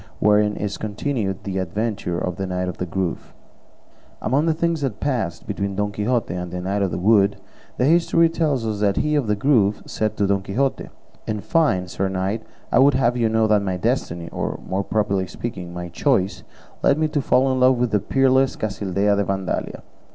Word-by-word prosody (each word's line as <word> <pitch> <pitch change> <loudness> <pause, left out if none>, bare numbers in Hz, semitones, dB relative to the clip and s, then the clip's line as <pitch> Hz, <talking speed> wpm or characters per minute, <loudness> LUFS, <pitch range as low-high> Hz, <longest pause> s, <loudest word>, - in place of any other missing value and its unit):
WHEREIN 105 0 +3
IS 105 -1 -4
CONTINUED 105 -2 -2
THE 95 -1 -3
ADVENTURE 95 -1 -2
OF 90 0 -3
THE 95 -1 -3
KNIGHT 90 0 -2
OF 90 - -6
THE 90 - -2
GROVE 90 0 -3 0.8
Among 140 +8 +1
the 160 - +3
things 170 -1 0
that 130 -7 -2
passed 120 -12 -2
between 100 0 -3
Don 105 +1 -1
Quixote 105 -1 -1
and 90 0 -4
the 90 - -4
Knight 95 +3 -1
of 100 - +1
the - - -3
Wood, 100 +1 +3 0.4
the 125 - +2
history 165 +1 +4
tells 155 -7 0
us 105 -2 0
he 150 0 +1
of 145 -6 +1
the 105 - +2
Grove 105 -3 +2
said 110 -1 -2
to 100 - +2
Don 100 0 +1
Quixote, 130 +8 -1 0.4
"In 105 -1 -2
fine, 105 - +1
sir 95 +2 -2
knight, 95 +4 -2 0.3
I - - +4
would 140 0 +5
have 120 -2 +2
you 115 -2 +1
know 110 0 +2
that 105 -1 +3
my 95 -2 -2
destiny, 90 -6 -1
or, - - -3
more 95 +1 -1
properly 100 -3 0
speaking, 90 -7 -6
my 90 0 -6
choice 100 - 0 0.4
led 140 - +3
me 155 0 +2
to 150 -1 0
fall 130 +1 +3
in 130 - 0
love 130 0 +5
with 120 -1 0
the 105 - +3
peerless 135 +4 +2
Casildea 100 -1 0
de 100 - +2
Vandalia. 95 -1 -3
105 Hz, 200 wpm, -22 LUFS, 95-130 Hz, 0.8 s, would